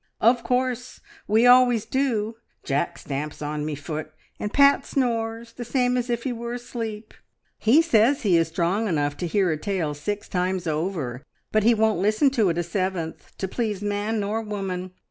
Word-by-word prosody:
"Of 235 Hz, +2 st, +4 dB
course. 250 Hz, 0 st, -1 dB, 0.3 s
We 220 Hz, +3 st, +4 dB
always 245 Hz, -3 st, +6 dB
do. 230 Hz, -4 st, -1 dB, 0.3 s
Jack 140 Hz, 0 st, -1 dB
stamps 145 Hz, +2 st, -5 dB
on 150 Hz, 0 st, -3 dB
me 150 Hz, 0 st, -3 dB
foot, 155 Hz, +1 st, -6 dB, 0.3 s
and 210 Hz, -, -3 dB
Pat 280 Hz, +1 st, +5 dB
snores, 230 Hz, -3 st, -2 dB
the 240 Hz, -, -6 dB
same 250 Hz, +1 st, +1 dB
as 245 Hz, 0 st, -1 dB
if 235 Hz, -1 st, -1 dB
he 260 Hz, -, -1 dB
were 235 Hz, 0 st, -5 dB
asleep. 230 Hz, -3 st, -6 dB, 0.5 s
He 270 Hz, +9 st, +5 dB
says 250 Hz, -2 st, +3 dB
he 195 Hz, -5 st, +4 dB
is 165 Hz, -1 st, +3 dB
strong 175 Hz, +7 st, 0 dB
enough 145 Hz, -5 st, 0 dB
to 175 Hz, -, -2 dB
hear 185 Hz, 0 st, +2 dB
a 155 Hz, -, -1 dB
tale 170 Hz, -3 st, -2 dB
six 205 Hz, +8 st, -4 dB
times 180 Hz, 0 st, -1 dB
over, 155 Hz, -6 st, -2 dB, 0.3 s
but 215 Hz, -, +3 dB
he 230 Hz, +2 st, +4 dB
won't 220 Hz, -3 st, +2 dB
listen 215 Hz, +7 st, +3 dB
to 220 Hz, -7 st, +2 dB
it 170 Hz, -, -1 dB
a 175 Hz, -, +1 dB
seventh, 175 Hz, -2 st, -4 dB
to 190 Hz, -, -2 dB
please 210 Hz, -1 st, -2 dB
man 205 Hz, +2 st, -1 dB
nor 210 Hz, +2 st, -1 dB
woman. 195 Hz, -4 st, -4 dB
210 Hz, 185 wpm, -24 LUFS, 175-235 Hz, 0.5 s, always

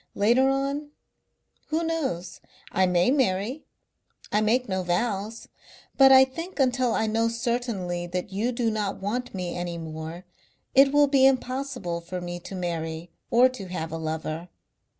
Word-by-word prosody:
Later 240 Hz, +6 st, +4 dB
on, 275 Hz, +2 st, -1 dB, 0.8 s
who 320 Hz, +2 st, 0 dB
knows? 270 Hz, -, -3 dB, 0.3 s
I 185 Hz, 0 st, +3 dB
may 180 Hz, +5 st, +3 dB
marry. 250 Hz, 0 st, 0 dB, 0.7 s
I 210 Hz, -, +2 dB
make 240 Hz, +4 st, +2 dB
no 190 Hz, -2 st, -1 dB
vows. 200 Hz, +4 st, -2 dB, 0.5 s
But 270 Hz, -1 st, +7 dB
I 265 Hz, 0 st, +9 dB
think 330 Hz, +7 st, -8 dB
until 255 Hz, -2 st, +2 dB
I 220 Hz, -, +1 dB
know 225 Hz, +1 st, +1 dB
certainly 230 Hz, -7 st, -2 dB
that 180 Hz, +2 st, -4 dB
you 220 Hz, +6 st, 0 dB
do 235 Hz, -2 st, 0 dB
not 210 Hz, -2 st, -2 dB
want 240 Hz, +4 st, -3 dB
me 180 Hz, -2 st, -3 dB
any 175 Hz, -1 st, -4 dB
more 160 Hz, +2 st, -7 dB, 0.5 s
it 275 Hz, +1 st, +6 dB
will 290 Hz, 0 st, +5 dB
be 270 Hz, -1 st, +5 dB
impossible 255 Hz, -9 st, -1 dB
for 180 Hz, +2 st, -5 dB
me 175 Hz, 0 st, -5 dB
to 190 Hz, -, -8 dB
marry 165 Hz, -2 st, -4 dB, 0.2 s
or 245 Hz, +2 st, +6 dB
to 220 Hz, -7 st, -8 dB
have 165 Hz, -3 st, -4 dB
a 165 Hz, -, -3 dB
lover. 160 Hz, +2 st, -4 dB
215 Hz, 155 wpm, -26 LUFS, 175-260 Hz, 0.8 s, I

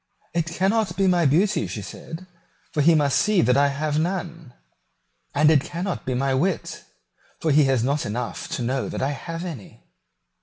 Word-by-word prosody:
"It 170 Hz, -1 st, 0 dB
cannot 195 Hz, +5 st, 0 dB
be 195 Hz, -, +2 dB
my 175 Hz, -4 st, +3 dB
beauty," 190 Hz, +9 st, +2 dB
she 105 Hz, -, -6 dB
said; 160 Hz, -, -9 dB, 0.5 s
"for 150 Hz, -, 0 dB
he 165 Hz, +3 st, +5 dB
must 145 Hz, -3 st, +3 dB
see 210 Hz, -3 st, +3 dB
that 125 Hz, +2 st, +3 dB
I 140 Hz, +1 st, +4 dB
have 150 Hz, +2 st, -1 dB
none; 170 Hz, -4 st, -3 dB, 0.8 s
and 150 Hz, +2 st, +5 dB
it 150 Hz, -4 st, +4 dB
cannot 175 Hz, -2 st, -4 dB
be 130 Hz, -, 0 dB
my 135 Hz, +1 st, 0 dB
wit, 170 Hz, +7 st, -1 dB, 0.5 s
for 160 Hz, -, 0 dB
he 145 Hz, 0 st, +5 dB
has 130 Hz, -4 st, +2 dB
not 140 Hz, +3 st, 0 dB
enough 115 Hz, +4 st, -4 dB
to 125 Hz, -, -3 dB
know 130 Hz, +3 st, -1 dB
that -, -, -3 dB
I 135 Hz, -, +1 dB
have 165 Hz, +4 st, -6 dB
any." 150 Hz, -, -9 dB
155 Hz, 185 wpm, -23 LUFS, 135-175 Hz, 0.8 s, he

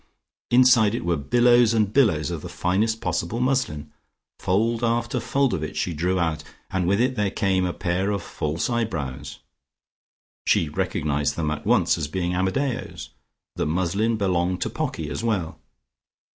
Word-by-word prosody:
Inside 120 Hz, -4 st, +5 dB
it 120 Hz, -, -4 dB
were 85 Hz, -1 st, +1 dB
billows 120 Hz, -, +4 dB
and 105 Hz, -2 st, +1 dB
billows 80 Hz, -, +2 dB
of -, -, -4 dB
the -, -, -8 dB
finest 110 Hz, +5 st, 0 dB
possible 90 Hz, +5 st, -2 dB
muslin. 125 Hz, -, -1 dB, 0.5 s
Fold 115 Hz, +5 st, 0 dB
after 120 Hz, +1 st, 0 dB
fold 135 Hz, +3 st, +1 dB
of -, -, -2 dB
it 80 Hz, -, -5 dB
she 90 Hz, -, -1 dB
drew 90 Hz, +4 st, 0 dB
out, 80 Hz, -2 st, -1 dB, 0.3 s
and 90 Hz, -2 st, 0 dB
with 100 Hz, +3 st, +2 dB
it 130 Hz, +2 st, +1 dB
there 105 Hz, -3 st, 0 dB
came 95 Hz, -2 st, 0 dB
a -, -, -1 dB
pair 90 Hz, +2 st, -1 dB
of 100 Hz, -1 st, -2 dB
false 75 Hz, +2 st, -3 dB
eyebrows. 75 Hz, -, -3 dB, 1.1 s
She 80 Hz, -, +2 dB
recognised 75 Hz, -1 st, -1 dB
them 80 Hz, -2 st, -1 dB
at 75 Hz, -, -5 dB
once -, -, +3 dB
as 75 Hz, -, -2 dB
being 90 Hz, +2 st, -2 dB
Amadeo's. 95 Hz, +9 st, -2 dB, 0.5 s
The -, -, 0 dB
muslin 95 Hz, +7 st, 0 dB
belonged 90 Hz, -2 st, 0 dB
to -, -, -1 dB
Pocky -, -, -3 dB
as -, -, -4 dB
well. 100 Hz, -8 st, -2 dB
95 Hz, 160 wpm, -24 LUFS, 80-115 Hz, 1.1 s, Inside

